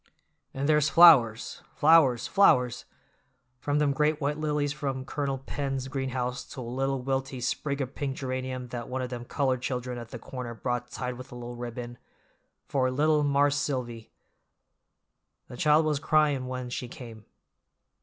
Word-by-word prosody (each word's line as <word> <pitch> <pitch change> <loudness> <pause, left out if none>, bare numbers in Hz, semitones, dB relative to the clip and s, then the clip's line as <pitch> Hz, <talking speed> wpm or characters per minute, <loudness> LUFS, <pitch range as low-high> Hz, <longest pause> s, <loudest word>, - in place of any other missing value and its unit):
And 135 +1 -3
there's 150 -1 +3
flowers, 135 -11 +6
flowers, 145 -6 +5
flowers!—from 125 - 0
them 150 -2 +2
great 150 +2 +1
white 150 +1 -1
lilies 150 -2 0
from 135 -3 -4
Colonel 140 -1 -2
Penn's 135 0 -4
greenhouse 125 -2 -3
to 130 - -6
a - - -5
little 135 +2 -2
wilty 135 0 -2
sprig 140 +3 -2
o' - - -1
pink 135 +1 -5
geranium 130 -1 -4
that 120 -1 -6
one 130 0 -2
of 125 - -5
them 120 -1 -6
colored 130 -1 0
children 125 -1 -3
at 120 -1 -9
the 125 - -7
corner 120 0 -7
brought 125 +1 -3
tied 125 0 -5
with 130 +2 -10
a - - -9
white 120 0 -7
ribbon, 120 0 -7 0.7
for 130 -2 +1
'little 150 +3 +2
Marse 145 0 +2
Silvy'; 120 -6 -3 1.4
the - - -10
child 150 +4 +3
was 150 -2 0
cryin' 150 -4 +2
when 125 -1 -5
she 125 - -4
came. 115 -3 -11
130 Hz, 155 wpm, -28 LUFS, 125-145 Hz, 1.4 s, flowers